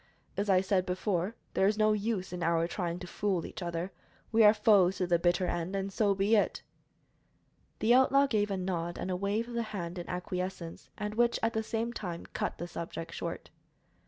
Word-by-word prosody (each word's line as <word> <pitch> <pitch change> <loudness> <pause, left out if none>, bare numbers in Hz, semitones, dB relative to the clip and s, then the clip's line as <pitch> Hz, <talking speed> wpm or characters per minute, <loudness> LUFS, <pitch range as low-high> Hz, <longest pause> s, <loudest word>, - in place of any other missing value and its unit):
As 205 +1 -1
I 185 -1 +5
said 190 -1 +1
before, 185 +2 -1 0.2
there 190 - +3
is 210 +1 +1
no 215 0 +4
use 205 -3 -2
in 180 - -4
our 165 0 +2
trying 175 -1 -3
to 180 - -7
fool 185 -1 -1
each - - -8
other. 170 +1 -3 0.4
We 225 0 +5
are 210 - +9
foes 205 -4 +4
to 185 - 0
the 175 -1 +2
bitter 175 +1 +2
end, 175 +2 -2
and 195 0 -3
so 205 -2 +2
be 200 +3 +3
it." 205 - +1 1.1
The 225 +2 +3
outlaw 270 +2 +5
gave 210 -6 +1
a 195 - -1
nod 175 -2 -2
and 185 - -3
a - - 0
wave 200 +5 -1
of 240 - -8
the 235 - 0
hand 185 -6 -5
in 175 - -7
acquiescence, 180 -1 -4
and 210 -1 -3
which, 235 +2 +2
at 225 - +2
the 220 - 0
same 225 +2 -2
time, 175 -7 -5
cut - - -2
the 175 - -5
subject 165 -1 -6
short. - - -5
190 Hz, 210 wpm, -31 LUFS, 175-215 Hz, 1.1 s, are